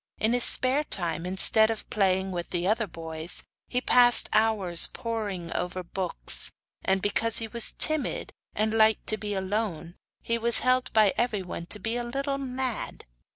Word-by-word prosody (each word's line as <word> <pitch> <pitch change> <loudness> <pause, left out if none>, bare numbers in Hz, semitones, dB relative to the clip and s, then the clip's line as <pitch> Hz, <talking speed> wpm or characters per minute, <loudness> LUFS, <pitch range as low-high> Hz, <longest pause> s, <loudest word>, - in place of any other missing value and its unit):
In 220 +2 0
his 245 -1 +3
spare 260 +4 +4
time, 175 - -2
instead 220 +4 +5
of 225 -1 -5
playing 190 -2 0
with 175 -1 -6
the 175 -1 -3
other 220 +1 0
boys, 165 -1 -5 0.2
he 250 - -2
passed 245 -1 +4
hours 210 -6 +5
poring 205 -7 -6
over 180 +1 -4
books, 180 - 0 0.3
and 190 0 -1
because 215 +2 +2
he 225 - -1
was 235 0 -3
timid 310 - +1 0.2
and 215 +1 -1
liked 220 -1 +2
to 215 - -1
be 205 -1 -5
alone 190 -4 -4 0.3
he 230 0 -2
was 235 0 +2
held 255 0 0
by 215 -3 +3
everyone 195 -7 -3
to - - -2
be 225 +4 -4
a 240 - -3
little 275 +3 -4
mad. 255 -3 -5
215 Hz, 165 wpm, -26 LUFS, 185-235 Hz, 0.3 s, instead